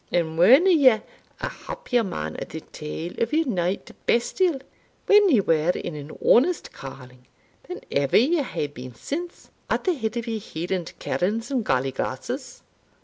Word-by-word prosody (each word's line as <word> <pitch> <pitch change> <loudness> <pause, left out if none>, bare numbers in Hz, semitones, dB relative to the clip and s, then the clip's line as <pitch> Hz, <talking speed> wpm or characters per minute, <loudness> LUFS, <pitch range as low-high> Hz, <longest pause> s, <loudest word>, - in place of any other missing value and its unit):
and 165 -2 0
werena 260 - +7
ye 260 -9 +6 0.4
a - - -1
happier 245 - -2
man 80 - -4
at - - -6
the 160 - -6
tail 160 +2 -7
o' 230 - +3
your 320 +1 +2
nowte 185 -6 -2 0.2
bestial, 295 +6 +2 0.5
when 410 -1 +6
ye 255 -9 +5
were 165 -3 +2
in 175 - -4
an 145 0 -8 0.2
honest 325 +8 +4
calling, 130 -2 -11 0.4
than 365 - -6
ever 140 -1 +3
ye 295 +8 +3
hae 250 - -3
been 130 -4 -9
since, 340 - -6 0.2
at - - 0
the 370 - +2
head 225 -5 -3
o' - - 0
your 230 -1 -3
Hieland 175 -1 -4
kernes 225 +7 -1
and 255 -4 0
gally 130 -5 +1
glasses?" - - -5
215 Hz, 165 wpm, -24 LUFS, -, 0.5 s, werena